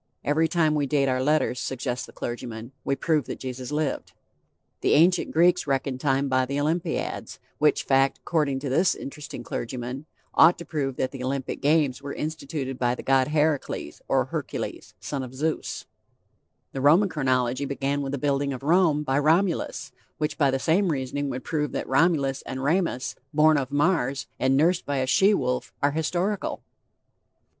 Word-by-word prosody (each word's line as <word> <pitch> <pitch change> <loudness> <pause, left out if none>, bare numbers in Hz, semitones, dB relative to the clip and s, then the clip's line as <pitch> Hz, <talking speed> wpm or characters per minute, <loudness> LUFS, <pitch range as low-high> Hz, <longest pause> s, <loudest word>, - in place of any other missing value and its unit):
Every 155 +3 +2
time 160 -2 +2
we 145 -2 0
date 140 0 +2
our 130 -1 +1
letters, 145 -3 +1
suggests 130 -1 -3
the - - -13
clergyman, 120 0 -6
we 140 - 0
prove 155 -2 +1
that - - -5
Jesus 130 0 -6
lived. 150 -2 -2 0.7
The - - +2
ancient 175 +3 +4
Greeks 175 +1 +3
reckoned 135 -1 -1
time 135 -1 +1
by 130 -1 +1
the 140 +2 -2
Olympiads, 160 +4 -2 0.2
which 150 0 +3
fact, 135 0 +2
according 150 -5 0
to 140 - -3
this 170 +7 +3
interesting 140 0 -8
clergyman, 125 +4 -5 0.3
ought 165 +2 +6
to 170 - -8
prove 135 -4 -2
that 130 0 -1
the 135 -2 -7
Olympic 130 0 -3
games 145 -3 +2
were 140 0 -6
instituted 140 -4 -4
by 120 0 +1
the - - -8
God 135 -1 +3
Heracles 150 -1 -1
or - - +2
Hercules, - - -5
son 140 -2 -4
of 130 0 -8
Zeus; 155 +4 -2 0.9
the 135 - -4
Roman 165 +9 +5
Chronology 130 -4 0
began 140 +1 -1
with 135 -1 -3
the 140 - -2
building 140 0 0
of 130 - -7
Rome 160 -1 +3
by 135 -1 +1
Romulus, 165 +4 +1 0.3
which 150 -1 -1
by 140 -3 +3
the 135 - +1
same 170 +8 +2
reasoning 140 0 -2
would 130 -1 -5
prove 150 -4 -2
that - - -3
Romulus 135 -2 +2
and 130 0 -4
Remus, 160 -4 0 0.2
born 155 +1 +5
of 135 -3 -1
Mars, 145 -3 +1
and 135 +1 +3
nursed 170 +4 +3
by 145 -1 -2
a 130 - +1
she 195 +10 +4
wolf, 125 -5 -2
are 145 - +2
historical. 175 +6 -2
140 Hz, 175 wpm, -25 LUFS, 130-155 Hz, 0.9 s, ought